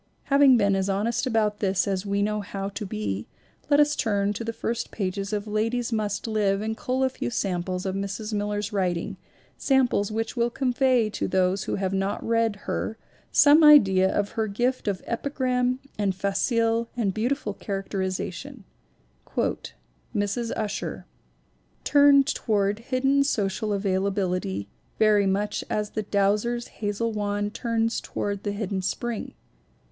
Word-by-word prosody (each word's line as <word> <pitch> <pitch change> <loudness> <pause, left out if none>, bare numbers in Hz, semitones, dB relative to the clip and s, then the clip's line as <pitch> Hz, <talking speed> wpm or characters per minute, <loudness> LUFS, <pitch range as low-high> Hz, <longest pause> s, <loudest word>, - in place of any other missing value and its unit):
Having 275 -3 +7
been 200 -3 +3
as 190 +1 0
honest 215 +6 0
about 215 -3 +1
this 190 -1 +1
as 195 0 -2
we 200 0 +1
know 210 0 -1
how 195 -1 -5
to 205 0 -6
be, 105 - -3 0.4
let 290 0 +5
us 295 0 +4
turn 205 -1 0
to 220 - -5
the 230 - -2
first 230 +1 -3
pages 195 0 -3
of 210 -1 -2
Ladies 225 +3 -1
Must 210 -2 -1
Live 210 -3 +1
and 220 +1 -2
cull 255 +3 -1
a 260 - +3
few 260 - -4
samples 185 -4 -2
of 190 - -1
Mrs. 200 +3 -4
Miller's 205 0 -2
writing, 180 -4 -1 0.4
sam 265 -2 +3
ples 205 -3 -1
which 225 +3 -2
will 235 -1 +1
convey 250 -3 +1
to - - -2
those 190 +1 +1
who - - -1
have 190 -1 -2
not 195 +1 -2
read 230 -2 +2
her 220 - -3 0.3
some 300 +2 +6
idea 195 -11 +7
of 205 0 0
her 220 -2 -1
gift 245 +4 -1
of 195 -3 -1
epigram 250 0 0 0.2
and 195 -2 +1
facile 225 +4 +1
and 205 -5 0
beau 220 +4 0
tiful 270 -6 -2
characterization: 195 +5 -4 1.5
"Mrs. 205 +3 -1
Ussher... 215 -2 -3 0.8
turned 285 -1 +6
toward 205 -6 0
hidden 270 +3 +2
social 210 -4 -1
availability 190 - -1 0.3
very 210 -2 +4
much 200 +2 -1
as 210 0 -1
the 215 - -2
douser's 210 +4 0
hazel 210 +2 -1
wand 205 0 -2
turns 230 -1 -1
toward 200 -1 -3
the 205 - -2
hidden 200 -2 -3
spring. 230 +4 -3
210 Hz, 150 wpm, -25 LUFS, 195-235 Hz, 1.5 s, Having